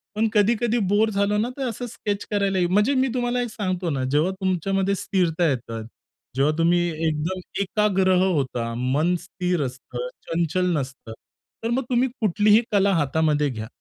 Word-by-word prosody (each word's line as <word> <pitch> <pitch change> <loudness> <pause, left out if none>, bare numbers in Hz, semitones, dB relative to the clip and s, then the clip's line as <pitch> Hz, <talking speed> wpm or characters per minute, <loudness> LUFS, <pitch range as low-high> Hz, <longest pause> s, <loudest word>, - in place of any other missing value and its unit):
पण 225 +1 +2
कधी-कधी 230 +3 +2
बोर 215 +2 +3
झालो 200 0 +1
ना, 230 +4 0
तर 265 -2 -2
असं 245 +2 -5
स्केच 205 -3 -4
करायला 200 -2 +1
म्हणजे 210 +7 +3
मी 260 +1 +3
तुम्हाला 245 0 0
एक 240 - -3
सांगतो 185 -5 -2
ना, 135 -3 -1
जेव्हा 155 +6 +2
तुमच्यामध्ये 195 +2 0
स्थिरता 175 -4 0
येतं, 115 -4 -4 0.5
जेव्हा 140 +3 +2
तुम्ही 170 +1 +3 0.3
एकदम 160 +5 -2 0.2
एकाग्रह 190 -2 +2
होता, 130 -9 -1
मन 145 +8 +1
स्थिर 180 -2 -2
असतं, 130 - -6 0.2
चंचल 170 +2 0
नसतं 130 -4 -6 0.5
तर 230 - -1
मग 260 +2 +1
तुम्ही 250 +1 +2
कुठलीही 210 +2 +4
कला 200 -1 +3
हातामध्ये 150 -1 +1
घ्या. 110 -3 -6
185 Hz, 155 wpm, -23 LUFS, 155-210 Hz, 0.5 s, कुठलीही